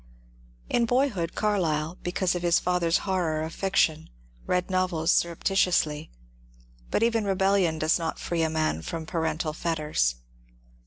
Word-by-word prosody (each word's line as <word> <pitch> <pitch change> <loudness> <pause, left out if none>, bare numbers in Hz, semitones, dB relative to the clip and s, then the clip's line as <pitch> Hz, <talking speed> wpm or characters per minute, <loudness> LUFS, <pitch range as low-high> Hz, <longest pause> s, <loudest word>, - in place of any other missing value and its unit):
In 235 -1 +1
boyhood 235 -10 0
Carlyle, 170 -6 0
because 180 0 0
of 175 - -3
his 175 0 +3
father's 175 -1 +1
horror 170 -5 0
of 160 +1 -5
fiction, 160 -5 +1 0.4
read 180 0 0
novels 185 -3 +1
surreptitiously; 170 -3 +1 0.8
but - - +1
even 230 -1 +2
rebellion 195 -4 +2
does 155 +2 +2
not 165 -1 -3
free 170 -1 -2
a 160 - +1
man 155 - -1
from 160 - -5
parental 160 -1 -2
fetters. 150 - 0
170 Hz, 135 wpm, -26 LUFS, 160-190 Hz, 0.8 s, his